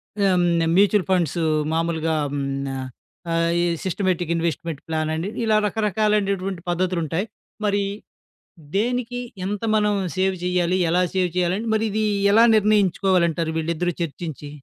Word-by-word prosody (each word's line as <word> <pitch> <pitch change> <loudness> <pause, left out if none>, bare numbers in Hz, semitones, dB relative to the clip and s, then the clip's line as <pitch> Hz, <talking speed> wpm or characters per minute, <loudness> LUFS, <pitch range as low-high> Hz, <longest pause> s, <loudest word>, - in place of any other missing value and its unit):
ఆహ్, 200 -1 +2
హ్మ్. 170 -2 +2
Mutual 200 -1 +4
funds 175 -2 +1 0.3
మాములుగా 165 0 0
ఆహ్, 145 - -3
హ్మ్. 140 -1 -2 0.2
న - - -3 0.6
ఆహ్, 165 0 +2
ఎ - - +2 0.2
సిస్టమేటిక్ 180 -2 -1
ఇన్‌వెస్ట్‌మెంట్ 165 -2 -2
ప్లానని, 160 +3 -2 0.2
ఇలా 215 -1 +3
రకరకాలైనటువంటి 200 -3 0
పద్ధతులుంటాయి. 175 0 -1 0.4
మరి 200 0 +1 0.9
దేనికి 245 +3 -1 0.3
ఎంత 205 +2 -3
మనం 210 -1 +2 0.2
సేవ్ 190 0 +1
చెయ్యాలి, 180 0 +1
ఎలా 180 +1 +3
సేవ్ 180 -1 +2
చేయాలి 180 +1 +2
అంటే, 230 - -4
మరి 220 +1 +1
ఇది 215 +1 0 0.3
ఎలా 230 +2 +7
నిర్ణయించుకోవాలి 195 -4 +3
అంటారు 160 0 -2
వీళ్ళిద్దరూ 170 +2 -1
చర్చించి? 150 -2 -6
180 Hz, 135 wpm, -22 LUFS, 165-205 Hz, 0.9 s, ఎలా